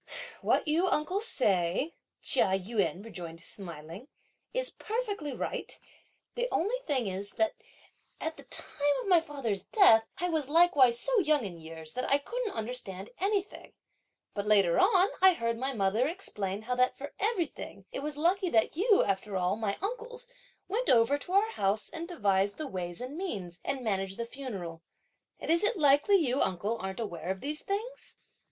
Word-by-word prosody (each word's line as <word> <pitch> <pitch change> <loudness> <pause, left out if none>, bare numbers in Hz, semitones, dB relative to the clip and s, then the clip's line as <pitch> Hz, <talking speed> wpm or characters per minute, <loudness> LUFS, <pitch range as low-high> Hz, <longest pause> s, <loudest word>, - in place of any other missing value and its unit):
"What - - +2
you, 330 +5 +3
uncle, 360 +4 +1
say," 205 - +1 0.3
Chia 190 - +3
Yun 200 0 -1
rejoined 170 -7 -8
smiling, 170 - -7 0.4
"is - - -2
perfectly 420 - -3
right; 250 - -4 0.5
the 485 0 -1
only 425 +9 +1
thing 265 -6 +1
is 195 +1 -5
that 330 -1 +1 0.7
at 320 0 -3
the - - -12
time 290 -1 -1
of - - -7
my 355 -2 +7
father's 265 - -3
death, 225 - +6
I 355 - 0
was 315 -5 -1
likewise 290 -7 +5
so - - +2
young 305 - +2
in 175 -4 -7
years 160 -1 -9
that 255 - -2
I 280 - +6
couldn't 475 +9 -4
understand 215 -4 -4
anything; 400 +1 -2 0.6
but 205 0 -3
later 195 -5 +4
on, 380 0 +5
I 380 0 +8
heard 230 -5 -2
my 265 +2 -1
mother 215 +2 +1
explain 210 - -4
how 250 +3 -1
that 255 0 +3
for 285 +1 -7
everything, 350 - -2
it - - -4
was 295 +1 -4
lucky 360 +4 +2
that 220 -2 +2
you, 405 +4 +4
after 195 0 -1
all, 180 +1 +1
my 215 -2 -2
uncles, 485 +3 -4 0.4
went 460 +6 0
over 240 +4 +5
to 355 - -7
our 420 +3 +4
house 200 - 0
and 330 +1 -6
devised 200 - +1
the 310 - -4
ways 180 -7 -5
and 255 +3 -5
means, 200 - -5
and 275 -2 -2
managed 195 -3 -1
the 235 - -2
funeral; 200 -11 -6 0.6
and - - -2
is 335 +3 +3
it 430 +1 +2
likely 290 +5 +5
you, 275 -8 +2
uncle, 200 +6 0
aren't 190 +2 -5
aware 175 -6 -4
of 190 0 -2
these 300 +2 -3
things? 450 +6 -5
260 Hz, 175 wpm, -30 LUFS, -, 0.7 s, I